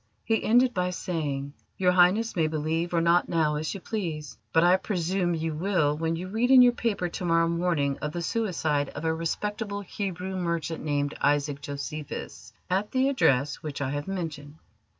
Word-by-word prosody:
He 225 -1 +1
ended 245 +2 +4
by 180 -1 0
saying: 145 -6 -3 0.2
"Your 180 -1 +3
Highness 185 +6 +3
may 160 -3 +2
believe 160 +2 -1
or 170 -1 +2
not 170 +1 +3
now 160 -3 +2
as 155 +1 -2
you - - -5
please, 165 - -4 0.2
but 165 - +4
I 180 +1 +6
presume 180 -2 -1
you 160 0 -2
will 155 -3 +1
when 165 +1 -1
you 180 +3 -5
read 225 +6 0
in 260 -1 +9
your 245 - +6
paper 220 -7 -1
to 175 - -6
morrow 165 -1 +3
morning 170 -5 0
of 150 - -3
the 170 +1 -4
suicide 165 - 0
of 150 - -5
a 160 - +2
respectable 205 +5 -3
Hebrew 190 -1 -4
merchant 170 -2 -2
named 145 -1 -1
Isaac 145 0 +1
Josephus 145 +1 -6 0.2
at 195 +3 0
the 260 +1 +2
address 140 - +2
which 150 -3 -6
I 135 -2 -2
have 145 +3 -4
mentioned." 155 -6 -5
170 Hz, 185 wpm, -27 LUFS, 150-190 Hz, 0.2 s, in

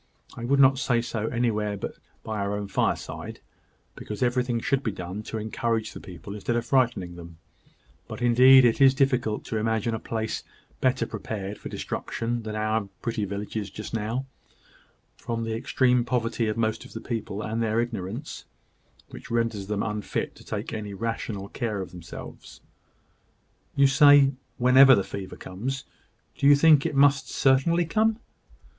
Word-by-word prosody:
I 120 - -6
would 140 +3 +2
not 135 -1 +6
say 120 -3 +1
so 115 -2 -3
anywhere 105 -4 -1
but - - -5 0.3
by 110 -1 -4
our 100 +1 -1
own 105 -1 -4
fireside, - - -2 0.5
because 105 +4 -5
everything 125 -1 +1
should 135 +3 0
be 115 - -2
done 95 +2 -6
to 110 - -6
encourage 110 +1 -2
the - - -8
people 90 +2 -9
instead 105 +3 -2
of 120 0 -1
frightening 120 -9 +1
them; 85 -1 -11 0.7
but - - -7
indeed 125 +2 +7
it 120 +3 +2
is 135 -1 +7
difficult 125 -6 +1
to 110 - -3
imagine 110 +1 0
a 110 - -2
place 110 -1 -3 0.4
better 130 0 +1
prepared 105 -1 -6
for - - -7
destruction 120 +1 -3
than 110 -1 -6
our 110 0 0 0.2
pretty 115 -3 -1
village 100 +2 -6
is 105 -2 -2
just 110 - -8
now, 115 +4 -2 0.9
from 115 -1 -4
the 115 0 -3
extreme 125 +1 +2
poverty 120 -2 -1
of 105 - -2
most 110 -1 -1
of - - -14
the 115 - -5
people, 110 -4 -4
and 110 +2 -2
their 110 0 +1
ignorance, 115 - -4 0.6
which - - -11
renders 115 -4 -1
them 105 -1 -1
unfit 105 -1 -3
to - - -16
take - - -5
any 105 -2 -5
rational 110 -2 -4
care 110 -2 -3
of 95 - -6
themselves." 85 -2 -10 1.2
"You 140 - +5
say, 145 0 +7 0.3
`whenever 130 +2 +7
the 100 - +1
fever 95 -1 -7
comes.' 130 +9 -5 0.5
Do 140 - +2
you 145 - +8
think 150 -1 +5
it - - -5
must 140 -1 +4
certainly 140 +6 +3
come?" 220 +6 +1
115 Hz, 165 wpm, -26 LUFS, 105-130 Hz, 1.2 s, you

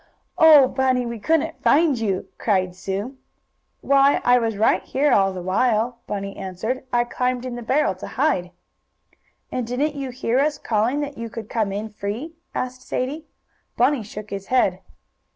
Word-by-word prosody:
"Oh, 305 -4 +8
Bunny, 255 -1 +1
we 235 -1 -5
couldn't 320 +7 0
find 295 -4 +3
you!" 195 -4 -1
cried 185 -4 0
Sue. 200 +8 -4 0.6
"Why, 275 0 +4
I 245 0 +5
was 225 -3 -2
right 215 - +3
here 285 +2 0
all 195 -1 +4
the 185 -2 -6
while," 230 +5 +1
Bunny 200 -1 -4
answered. 220 +8 -4
"I 240 0 +3
climbed 250 +1 -2
in 250 -1 -4
the 240 - -6
barrel 260 -2 +1
to 185 - -9
hide." 225 - 0 1.0
"And 250 -3 -2
didn't 280 +5 -1
you 275 -2 -5
hear 250 0 0
us 295 +1 +1
calling 235 +6 0
that 285 -4 -5
you 230 0 -5
could 220 -1 -8
come 215 -4 0
in 210 +3 -4
free?" 215 +9 -5 0.2
asked 255 0 -3
Sadie. 295 +5 -4 0.5
Bunny 260 +1 +3
shook 210 0 -9
his 195 -1 -5
head. 190 -8 +2
240 Hz, 170 wpm, -22 LUFS, 205-265 Hz, 1.0 s, Oh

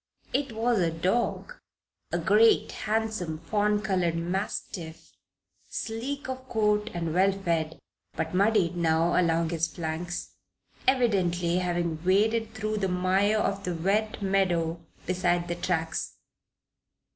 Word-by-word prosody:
It 275 -2 0
was 230 0 +1
a 170 -2 +2
dog 190 - -1 0.5
a 175 - +1
great, 210 +7 +4
handsome, 215 -7 -2
fawn 210 +5 0
colored 180 -5 +1
mastiff, 170 -2 -4 0.6
sleek 255 +6 -4
of 260 0 -6
coat 210 -1 +1
and 165 -2 -2
well 190 +3 +4
fed, 170 -5 -1 0.4
but - - -3
muddied 195 -2 +3
now 165 0 +2
along 165 -2 +2
his 165 0 +1
flanks, 170 +1 -4 0.6
evidently 185 -9 +2
having 175 -3 -1
waded 220 +4 +2
through 215 0 -2
the 195 -2 0
mire 190 +4 +2
of 200 -2 -1
the 180 -2 -2
wet 205 +5 0
meadow 175 -4 +1 0.2
beside 175 -1 +1
the 175 - -2
tracks. 170 -2 -2
185 Hz, 120 wpm, -27 LUFS, 170-215 Hz, 0.6 s, great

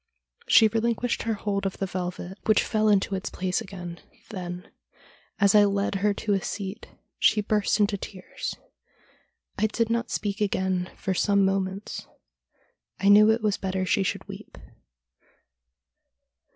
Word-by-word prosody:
She 220 - +7
relinquished 230 +2 0
her 225 -1 -1
hold 200 -1 -2
of 190 - -6
the 195 - -1
velvet, 180 +1 -5
which 215 -1 +4
fell 215 -1 +1
into 200 -1 +2
its 190 +1 -3
place 185 0 -2
again; 175 -3 -8 0.3
then, 180 -3 -6 0.7
as 200 -2 +5
I 210 -1 +7
led 200 0 0
her 210 0 +3
to 205 +1 -1
a 195 - +1
seat, 195 0 -5 0.3
she - - +4
burst 210 0 +1
into 205 -1 +2
tears. 185 -1 -6 1.0
I 215 - +3
did 230 +1 -1
not 235 +1 0
speak 205 0 -3
again 190 -3 0
for 190 - -2
some 200 +1 +3
moments. 195 +1 -2 0.9
I 200 - +3
knew 210 +1 +8
it 220 0 +2
was 205 -3 +1
better 190 -1 -2
she 195 - +2
should 190 - -2
weep. - - -10
200 Hz, 150 wpm, -26 LUFS, 190-215 Hz, 1.0 s, knew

